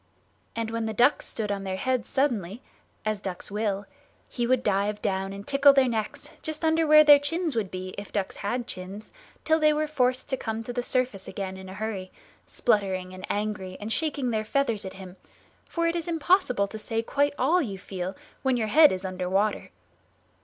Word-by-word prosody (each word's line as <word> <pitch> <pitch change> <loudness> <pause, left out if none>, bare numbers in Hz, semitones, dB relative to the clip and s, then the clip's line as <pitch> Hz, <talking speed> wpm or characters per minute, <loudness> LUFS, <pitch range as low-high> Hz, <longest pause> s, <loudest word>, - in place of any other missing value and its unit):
And 225 -1 -2
when 230 -1 -2
the 220 - -4
ducks 250 +7 +3
stood 210 -3 -3
on 200 -1 -2
their 190 -1 -3
heads 255 +4 -1
suddenly, 235 -5 -1 0.4
as 215 -2 -1
ducks 190 0 -5
will, 205 -1 -1 0.4
he 240 -1 -2
would 255 0 +2
dive 205 +1 +1
down 190 0 -1
and 200 +1 -8
tickle 280 0 +6
their 270 -2 +4
necks, 220 -3 -3
just 315 0 -4
under 320 0 +3
where 305 0 +8
their 290 -1 +8
chins 320 +1 -1
would 215 -4 -1
be 185 0 -6
if 205 - -9
ducks 200 -2 -2
had 240 +4 -2
chins, 195 +1 -7 0.3
till 315 0 +3
they 305 -1 +5
were 305 +1 +1
forced 255 -4 0
to 265 - 0
come 225 -1 -4
to 245 - -6
the 245 - -1
surface 245 -6 -1
again 190 -1 -5
in 190 0 -10
a 190 - -8
hurry, 200 -3 -4 0.4
spluttering 190 -5 0
and 185 0 -8
angry 205 -3 -3
and 215 +2 -2
shaking 285 -6 -1
their 215 -1 0
feathers 230 -3 0
at 190 - -6
him, 190 -1 -11 0.5
for 335 -1 -2
it 335 0 +1
is 340 0 -3
impossible 325 - +2
to 220 +2 -8
say 225 +1 -2
quite 285 +4 +1
all 320 +8 +3
you 200 -8 -4
feel 185 0 -5 0.3
when 260 -2 +2
your 220 -2 -1
head 305 +5 +7
is 185 +1 -3
under 185 -1 -3
water. 200 +3 0
220 Hz, 205 wpm, -27 LUFS, 195-275 Hz, 0.5 s, where